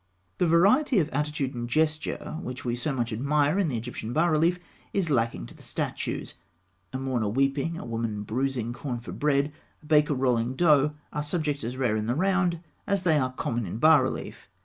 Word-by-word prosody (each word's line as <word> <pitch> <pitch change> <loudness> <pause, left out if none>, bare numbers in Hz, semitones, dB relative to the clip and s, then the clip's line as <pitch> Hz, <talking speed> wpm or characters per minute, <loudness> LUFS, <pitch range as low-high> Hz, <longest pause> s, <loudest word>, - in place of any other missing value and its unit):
The 180 - +3
variety 205 - +4
of 160 -4 +2
attitude 150 -2 -2
and 120 -1 -4
gesture 155 +2 -1
which 125 0 -6
we 120 - 0
so 125 +5 -2
much 120 -3 -2
admire 145 - +2
in 195 - +2
the 125 - -1
Egyptian 115 0 -5
bas 165 +3 +3
relief 165 +3 +3 0.4
is 180 -6 0
lacking 115 - 0
to - - -11
the - - -16
statues. - - -3 0.6
A - - -3
mourner 130 -5 -1
weeping, 135 +7 0
a - - -7
woman 115 -3 -3
bruising 120 +1 -1
corn 125 -1 -4
for 120 - -9
bread, 145 0 +1 0.3
a - - -20
baker 150 -1 +3
rolling 125 -1 +1
dough, 150 -2 +4 0.2
are 150 - -1
subjects 150 -2 -2
as 120 +3 -4
rare 125 -5 +1
in 110 0 -2
the 120 - +1
round 180 -1 +1 0.3
as 200 -2 +1
they 160 -4 +4
are 130 -1 0
common 120 -4 -2
in 90 - -4
bas 155 +4 +6
relief. - - -5
140 Hz, 195 wpm, -27 LUFS, 120-155 Hz, 0.6 s, bas